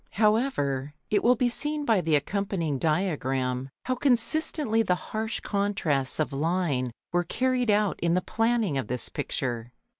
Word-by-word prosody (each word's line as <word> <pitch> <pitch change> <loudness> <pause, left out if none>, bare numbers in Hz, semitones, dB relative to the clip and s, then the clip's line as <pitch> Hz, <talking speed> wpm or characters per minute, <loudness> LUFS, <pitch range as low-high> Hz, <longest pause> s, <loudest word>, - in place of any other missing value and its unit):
However, 150 - +1 0.2
it 205 - +2
will 245 +2 +5
be 245 +1 +2
seen 295 +4 0
by 220 -7 +3
the 160 -2 +2
accompanying 165 -2 -1
diagram 135 -6 0 0.2
how 255 - +1
consistently 255 -1 +1
the 180 -5 +2
harsh 220 +5 -4
contrasts 185 -11 0
of 155 -2 0
line 145 -4 0 0.2
were 175 0 +2
carried 250 +6 0
out 205 -1 +2
in 170 0 +1
the 180 - +2
planning 225 - +1
of 130 - -4
this 125 +1 -2
picture. 120 -4 -3
185 Hz, 150 wpm, -27 LUFS, 140-225 Hz, 0.2 s, will